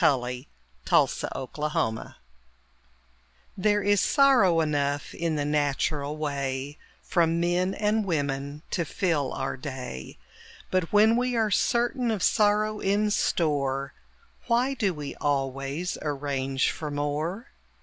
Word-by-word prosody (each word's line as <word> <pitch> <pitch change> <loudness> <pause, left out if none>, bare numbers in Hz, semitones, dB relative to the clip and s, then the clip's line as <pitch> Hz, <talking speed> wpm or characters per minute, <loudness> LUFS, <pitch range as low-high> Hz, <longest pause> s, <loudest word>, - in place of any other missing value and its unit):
THE - - +6 0.8
POWER - - +6 0.3
OF 130 - -6
THE 150 0 -2
DOG 110 0 -1 1.4
There 205 +1 +2
is 205 0 +3
sorrow 245 -12 +4
enough 145 -2 0
in 165 -1 -1
the 145 -1 -1
natural 145 0 0
way 140 -1 -3 0.2
From 170 -2 +2
men 180 +2 +1
and 210 +1 +1
women 145 -4 -2
to 170 - 0
fill 160 -4 -1
our 135 0 -3
day; 130 - -7 0.5
But 185 -3 0
when 215 +2 +5
we 250 0 0
are 220 -2 +1
certain 240 +4 +1
of 215 -5 -1
sorrow 215 0 +2
in 205 +2 +1
store, 140 -7 0 0.5
Why 245 +3 +2
do 215 -7 0
we 150 -4 -6
always 135 +4 -2
arrange 135 -2 -1
for 150 - -5
more? 150 - -3
155 Hz, 125 wpm, -27 LUFS, 140-205 Hz, 1.4 s, THE